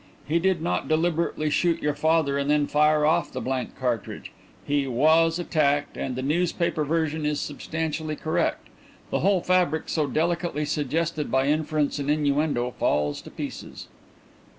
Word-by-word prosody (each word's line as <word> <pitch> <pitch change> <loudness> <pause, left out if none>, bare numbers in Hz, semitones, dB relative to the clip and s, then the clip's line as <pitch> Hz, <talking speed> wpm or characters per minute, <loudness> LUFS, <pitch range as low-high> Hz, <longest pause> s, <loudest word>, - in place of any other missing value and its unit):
He 165 +4 +2
did 180 -2 +1
not 170 - -1
deliberately 160 -1 0
shoot 170 +1 +2
your 150 0 0
father 155 -1 +2
and 140 0 -1
then 150 -1 +3
fire 150 +1 +3
off 155 - +2
the - - -4
blank 130 -1 -3
cartridge. 120 -5 -3 0.3
He 145 -1 0
was 160 +6 +3
attacked 145 -4 0
and 130 - -3
the 130 - -3
newspaper 170 +1 0
version 160 0 -1
is 150 -1 0
substantially 155 +1 -3
correct. 155 +1 -1 0.4
The - - +1
whole 195 0 +2
fabric 180 -3 +1
so 155 -3 0
delicately 170 0 -1
suggested 155 +2 -1
by 130 0 +2
inference 150 -1 0
and 140 0 -3
innuendo 145 -4 +1
falls 75 0 0
to - - -11
pieces." - - -7
155 Hz, 150 wpm, -25 LUFS, 145-165 Hz, 0.4 s, then